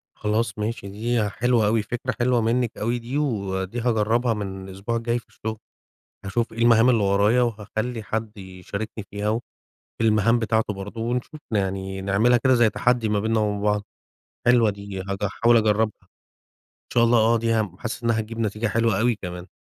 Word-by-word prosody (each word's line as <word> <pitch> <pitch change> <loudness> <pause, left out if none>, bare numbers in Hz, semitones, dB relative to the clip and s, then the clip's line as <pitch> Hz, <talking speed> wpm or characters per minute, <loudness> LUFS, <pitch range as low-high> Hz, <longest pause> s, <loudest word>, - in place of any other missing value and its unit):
خلاص 105 0 -1
ماشي. 105 -1 -3
دي 110 +1 -1
حلوة 115 0 +2
أوي 110 +1 +2
فكرة 120 +4 -3
حلوة 120 -1 +2
منِك 115 +1 0
أوي 120 +3 -1
دي، 120 +4 -4
ودي 100 -6 -2
هاجرّبها 115 0 +1
من 95 -2 -5
الأسبوع 100 +5 -4
الجاي 115 +1 0
في - - -23
الشغل. 110 0 -5 0.7
هاشوف 115 +5 -1
إيه 115 - -8
المهام 115 0 +5
اللي 115 -4 +3
ورايا 100 +5 +3
وهاخلّي 110 0 -2
حد 110 +1 -4
يشاركني 100 +3 -6
فيها، 105 +1 -2
وفي 115 +2 0 0.6
المهام 110 +1 +3
بتاعته 110 -2 0
برضو، 100 +3 -7
ونشوف 125 +5 -3
يعني 95 -2 -2
نعملها 100 +6 +3
كده 130 -1 +5
زي 120 -2 +4
تحدّي 120 -1 +1
ما 105 -1 +1
بيننا 110 +1 +1
وبين 105 -1 -1
بعض. 105 0 +1 0.6
حلوة 120 -2 +5
دي 100 -1 -6
هج 100 +1 -4
احاول 115 +4 +3
أجربها. 110 0 +1
إن - - -35 0.7
شاء 120 - +4
الله 120 0 +4
آه 115 +1 +4
دي 115 0 0 0.3
حاسّس 120 +1 -5
إنّها 115 -1 +2
هتجيب 115 +1 -5
نتيجة 110 +1 -1
حلوة 115 -2 +1
أوي 120 +1 +2
كمان. 90 -2 -7
110 Hz, 175 wpm, -24 LUFS, 105-120 Hz, 0.7 s, المهام